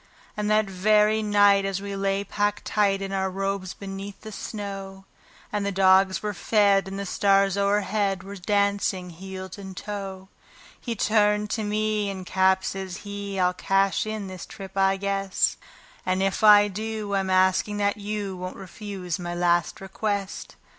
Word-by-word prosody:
And 210 0 -2
that 215 0 +3
very 210 +3 +3
night, 205 -1 +4
as 195 -1 -2
we 200 0 -5
lay 195 0 0
packed 205 0 -1
tight 200 -2 +1
in 195 - -4
our 190 -1 0
robes 195 0 -3
beneath 195 0 -7
the 220 - -9
snow, 195 -2 -6 0.5
And 210 -1 -1
the 200 - -1
dogs 190 0 +4
were 210 -1 -2
fed, 200 -1 +3
and 195 0 -6
the 200 - -4
stars 195 0 +3
o'erhead 200 -1 +1
were 200 +1 -8
dancing 200 -1 0
heel 190 +2 -8
and 190 -2 -9
toe, 195 -2 -6 0.5
He 235 -2 -4
turned 210 0 +2
to 220 - -1
me, 210 0 0
and 190 -2 -6
"Cap," 190 0 +2
says 190 -2 -4
he, 200 -1 -5
"I'll 180 0 +3
cash 195 +3 +1
in 215 -2 -4
this 185 -2 -8
trip, 195 -2 -10
I 195 0 +3
guess; 195 -1 0 0.5
And 185 +1 0
if 195 +3 -1
I 205 -1 +8
do, 215 0 -4
I'm 195 -1 0
asking 185 +2 +2
that 205 0 +1
you 205 -2 -4
won't 185 0 -6
refuse 190 -2 -6
my 175 0 -4
last 175 -1 +1
request." 200 0 -4
195 Hz, 165 wpm, -25 LUFS, 190-205 Hz, 0.5 s, I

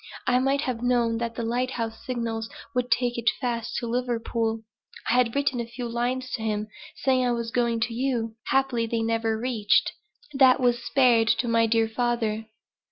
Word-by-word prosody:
I 250 -1 +3
might 270 +2 +1
have 250 -5 -3
known 240 -2 +1
that 235 -1 -3
the 235 - -3
lighthouse 235 -1 -2
signals 230 -3 -3 0.2
would 250 0 -1
take 245 -1 +1
it 235 - +3
fast 235 -3 -2
to - - -2
Liverpool. 230 -2 -1 0.5
I - - +2
had 245 -1 +2
written 280 -3 +1
a 235 - -3
few 240 +1 -6
lines 245 +2 -2
to 230 - -3
him 215 -1 -2 0.3
saying 260 -1 +2
I 245 - +2
was 235 -1 -3
going 235 -2 0
to 230 - 0
you; 235 -2 -1
happily 265 -4 +1
they 225 0 -1
never 225 -1 0
reached 225 -3 +2 0.4
that 265 -2 +5
was 245 -2 +1
spared 245 -4 +4
to 240 - +2
my 230 0 +3
dear 225 0 +2
father." 225 -2 -1
235 Hz, 180 wpm, -26 LUFS, 230-250 Hz, 0.5 s, that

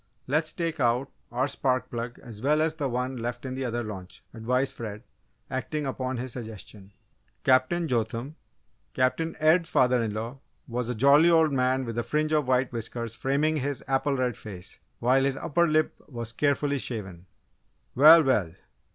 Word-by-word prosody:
"Let's 155 +3 0
take 165 -2 -3
out 125 +2 +1 0.2
our 125 +3 0
spark 130 -2 -1
plug 120 0 -4
as 110 -4 -10
well 150 +4 +2
as 160 0 0
the 145 -4 -2
one 125 +1 -2
left 120 +2 -4
in 130 - -4
the 130 +1 -3
other 120 0 -2
launch," 95 -4 -9
advised 125 +4 -1
Fred, 105 -1 -7 0.4
acting 140 +3 -3
upon 130 -1 -3
his 125 0 -5
suggestion. 105 -4 -9 0.5
Captain 130 +7 +3
Jotham, 120 +3 -2 0.6
Captain 145 +6 0
Ed's 165 +2 +3
father 125 -1 +3
in 110 - -2
law, 115 +5 -5 0.3
was 120 -1 -3
a 125 - -2
jolly 140 +8 +6
old 160 -3 +4
man 130 0 +1
with 115 0 -3
a - - -1
fringe 155 +3 0
of 150 -4 +2
white 130 0 +2
whiskers 115 0 -5
framing 145 +6 0
his 140 -2 -3
apple 135 +1 +1
red 125 -2 0
face, 95 -4 -9 0.2
while 130 +3 +3
his 135 0 0
upper 170 +4 +1
lip 155 0 +2
was 115 -3 -6
carefully 145 +1 +1
shaven. 95 -8 -6 0.7
"Well, 155 +5 +8
well! 105 - +1
130 Hz, 170 wpm, -27 LUFS, 115-145 Hz, 0.7 s, Well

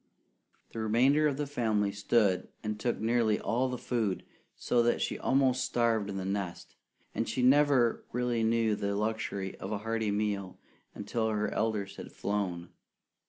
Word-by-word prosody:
The 115 - -5
remainder 130 +8 +3
of 140 -2 -1
the 145 - -1
family 110 -7 0
stood 100 -1 +1 0.2
and 105 -1 -3
took 120 +1 -1
nearly 115 -1 +2
all 125 +3 0
the 125 - -3
food 115 -6 -2 0.3
so 120 - +1
that 120 0 +2
she - - -2
almost 130 -1 +2
starved 115 -4 +1
in 100 - -4
the 95 - -3
nest, 95 -3 -4 0.4
and 115 - -2
she 125 - -1
never 135 -3 +4
really 120 -1 0
knew 115 -1 +2
the 100 0 -2
luxury 105 -2 -2
of 95 - -6
a 105 - 0
hearty 110 -1 0
meal 100 -2 -2 0.4
until 110 +2 -2
her 105 -1 -1
elders 105 -3 -1
had - - -8
flown. 90 -4 -3
110 Hz, 165 wpm, -30 LUFS, 100-120 Hz, 0.4 s, never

